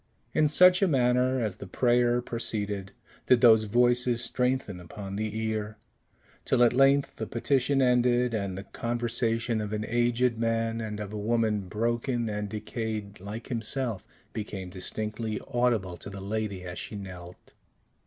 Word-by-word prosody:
In 155 Hz, -, +4 dB
such 180 Hz, +4 st, +6 dB
a 195 Hz, -, +4 dB
manner, 130 Hz, -2 st, +2 dB
as 105 Hz, -4 st, -2 dB
the 100 Hz, -, -8 dB
prayer 120 Hz, +3 st, +2 dB
proceeded, 105 Hz, -5 st, -3 dB, 0.4 s
did 125 Hz, -2 st, +5 dB
those 110 Hz, -3 st, +7 dB
voices 120 Hz, +2 st, +2 dB
strengthen 125 Hz, -7 st, -1 dB
upon 95 Hz, +3 st, -8 dB
the 110 Hz, +1 st, -3 dB
ear; 110 Hz, -1 st, -3 dB, 0.7 s
till 125 Hz, -2 st, +3 dB
at 120 Hz, -, +4 dB
length 135 Hz, +2 st, +3 dB
the 110 Hz, -, -4 dB
petition 135 Hz, +2 st, +1 dB
ended, 125 Hz, -1 st, +3 dB
and 100 Hz, -4 st, -2 dB
the 95 Hz, -, -6 dB
conversation 115 Hz, 0 st, -1 dB
of 105 Hz, 0 st, -4 dB
an 105 Hz, 0 st, -2 dB
aged 120 Hz, 0 st, +1 dB
man, 115 Hz, 0 st, 0 dB
and 105 Hz, -1 st, -5 dB
of 105 Hz, 0 st, -6 dB
a 105 Hz, -, -4 dB
woman 110 Hz, -1 st, +1 dB
broken 120 Hz, +3 st, -1 dB
and 105 Hz, -1 st, -3 dB
decayed 105 Hz, -1 st, -5 dB
like 105 Hz, +5 st, -7 dB
himself, 115 Hz, -3 st, -2 dB, 0.3 s
became 100 Hz, -4 st, -5 dB
distinctly 105 Hz, +3 st, -4 dB
audible 115 Hz, -7 st, 0 dB
to -, -, -8 dB
the 100 Hz, 0 st, -8 dB
lady 100 Hz, -1 st, -3 dB
as 90 Hz, 0 st, -6 dB
she -, -, -7 dB
knelt. 90 Hz, -3 st, -10 dB
115 Hz, 155 wpm, -28 LUFS, 105-120 Hz, 0.7 s, those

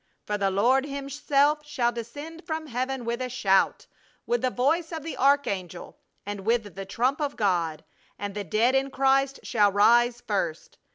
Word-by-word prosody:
For 210 Hz, -, -2 dB
the 200 Hz, -1 st, +1 dB
Lord 250 Hz, +8 st, +2 dB
Himself 280 Hz, +1 st, 0 dB
shall 265 Hz, -5 st, 0 dB
descend 290 Hz, +9 st, -8 dB
from 315 Hz, -1 st, -3 dB
heaven 260 Hz, -1 st, -3 dB
with 235 Hz, +2 st, -2 dB
a 255 Hz, -, -2 dB
shout, 195 Hz, -6 st, +2 dB, 0.4 s
with 480 Hz, +1 st, 0 dB
the 255 Hz, -, +1 dB
voice 315 Hz, +8 st, 0 dB
of 320 Hz, -3 st, -5 dB
the 325 Hz, -, -5 dB
archangel 200 Hz, -, 0 dB, 0.3 s
and 205 Hz, 0 st, -5 dB
with 220 Hz, 0 st, -1 dB
the 195 Hz, 0 st, -7 dB
trump 255 Hz, +9 st, 0 dB
of 290 Hz, -1 st, -2 dB
God: 170 Hz, -6 st, 0 dB, 0.3 s
and 205 Hz, 0 st, -5 dB
the 205 Hz, 0 st, -4 dB
dead 220 Hz, +8 st, +2 dB
in 270 Hz, 0 st, +1 dB
Christ 270 Hz, +1 st, +1 dB
shall 205 Hz, -3 st, +3 dB
rise 240 Hz, +4 st, +4 dB
first. 190 Hz, -8 st, -3 dB
245 Hz, 170 wpm, -26 LUFS, 205-280 Hz, 0.4 s, rise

